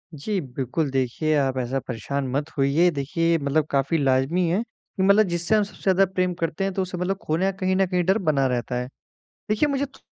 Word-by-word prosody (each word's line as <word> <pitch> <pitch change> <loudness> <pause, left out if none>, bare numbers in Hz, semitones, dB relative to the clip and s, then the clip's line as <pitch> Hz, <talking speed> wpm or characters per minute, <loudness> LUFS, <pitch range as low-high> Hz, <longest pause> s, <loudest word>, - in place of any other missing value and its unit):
जी 195 +8 -2
बिल्कुल, 135 +2 -3
देखिए 135 +4 0
आप 135 -2 0
ऐसा 130 +1 -1
परेशान 130 +4 -3
मत 145 +3 -2
होइए। 140 +6 +3
देखिए 165 +3 -1
ये 165 - +4
मतलब 145 +1 0
काफ़ी 140 +4 +1
लाज़मी 140 +5 +2
है 185 +6 +1
कि 215 -4 -7
मतलब 200 +3 +6
जिससे 175 +3 0
हम 210 - +3
सबसे 205 - -11
ज़्यादा 195 0 +4
प्रेम 185 -1 +1
करते 165 +1 -3
हैं 195 0 -1
तो 190 - -1
उससे 185 -1 -4
मतलब 185 +2 -1
खोने 180 +5 0
का 190 - -17
कहीं 185 -1 0
न 190 0 +3
कहीं 180 -1 0
डर 190 +4 +3
बना 155 -9 +1
रहता 125 -1 -2
है। 125 0 -2 0.6
देखिए, 215 +8 +2
मुझे 280 0 0
तो 275 - -17
165 Hz, 225 wpm, -24 LUFS, 135-190 Hz, 0.6 s, मतलब